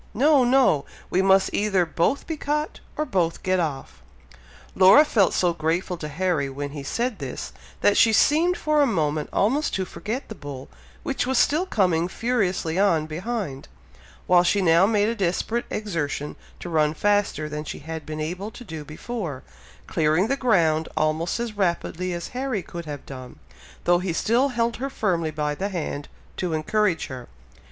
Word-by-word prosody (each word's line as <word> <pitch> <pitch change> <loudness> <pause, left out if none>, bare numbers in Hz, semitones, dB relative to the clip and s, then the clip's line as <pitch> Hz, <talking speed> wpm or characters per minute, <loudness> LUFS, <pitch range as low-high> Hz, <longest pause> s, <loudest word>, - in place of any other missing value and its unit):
No! 280 +3 +5
no! 245 - +4 0.3
we 185 - +3
must 190 0 +4
either 195 -4 +2
both 170 - 0
be 320 - -3
caught, 300 +1 -2 0.2
or 305 - 0
both 175 - -1
get 185 0 +1
off!" 135 - -4 0.7
Laura 195 +11 +7
felt 210 -10 +3
so 175 -2 +2
grateful 170 +3 -1
to 155 - -5
Harry 150 -2 -1
when 140 +1 -5
he 145 -1 -6
said 235 - -2
this, - - -6 0.3
that 205 - +4
she 225 - +5
seemed 325 - +3
for 305 -1 +2
a 285 - +4
moment 155 - -1
almost 270 +10 +1
to 190 - -1
forget 225 +8 -5
the - - -7
bull, 140 -8 -9 0.3
which - - -1
was 265 -1 +1
still 320 +9 +3
coming 180 - +2
furiously 190 -6 -1
on 170 -6 +3
behind, 165 - -4 0.6
while 180 -1 +5
she 180 +3 +2
now 175 0 +5
made 210 -1 +2
a 230 - 0
desperate 220 +3 -1
exertion 165 -8 -3 0.2
to - - -7
run 155 -2 +1
faster 205 -6 +1
than 150 0 -5
she - - -6
had 160 +1 -7
been 155 0 -6
able 180 +7 -4
to 245 - -11
do 160 -8 -7
before, 155 - -6 0.4
clearing 160 +7 +1
the 275 - +2
ground 165 - +2
almost 155 +6 0
as 235 -2 -4
rapidly 180 -1 -1
as 175 -1 -4
Harry 250 -6 -3
could 170 -1 -8
have 145 -2 -7
done, 130 -2 -9 0.5
though 175 0 +4
he 180 -1 -2
still 235 +10 +2
held 235 -3 -1
her 270 +2 -3
firmly 175 -10 0
by 150 -1 -2
the 195 +7 -3
hand, 155 -6 -4 0.3
to 180 -3 -2
encourage 175 +3 +1
her. 130 -2 -8
180 Hz, 175 wpm, -24 LUFS, 155-225 Hz, 0.7 s, Laura